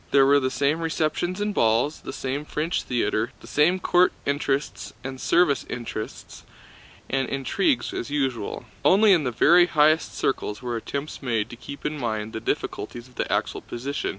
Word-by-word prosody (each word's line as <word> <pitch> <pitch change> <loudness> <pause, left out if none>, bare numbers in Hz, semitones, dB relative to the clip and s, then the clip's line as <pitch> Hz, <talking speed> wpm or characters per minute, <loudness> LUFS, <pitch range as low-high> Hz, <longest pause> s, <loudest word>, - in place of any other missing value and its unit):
There 135 -1 +5
were 140 +1 +5
the 130 -1 0
same 140 +4 +1
receptions 165 +3 -1
and 205 0 -1
balls, 115 - +2
the - - -7
same 135 +1 -3
French 155 +3 -2
theater, 115 -2 -1
the - - -14
same 150 +9 +2
court 180 0 +4
interests 140 0 -1
and 130 0 -6
service 165 -5 +3
interests 115 -3 -6 0.6
and 135 -2 -1
intrigues 245 - 0
as 120 - -4
usual. 135 -7 -2 0.2
Only 200 +2 +6
in 165 -5 +2
the 125 - 0
very 175 +9 +5
highest 155 0 +3
circles 105 -5 -1
were 120 -2 -4
attempts 140 +6 -5
made 115 -6 -1
to - - -7
keep 140 +3 -10
in 150 0 -2
mind 110 -3 -3
the - - -3
difficulties 120 +1 -3
of 125 - -20
the - - -3
actual - - -1
position. 135 +4 -4
140 Hz, 175 wpm, -25 LUFS, 120-155 Hz, 0.6 s, Only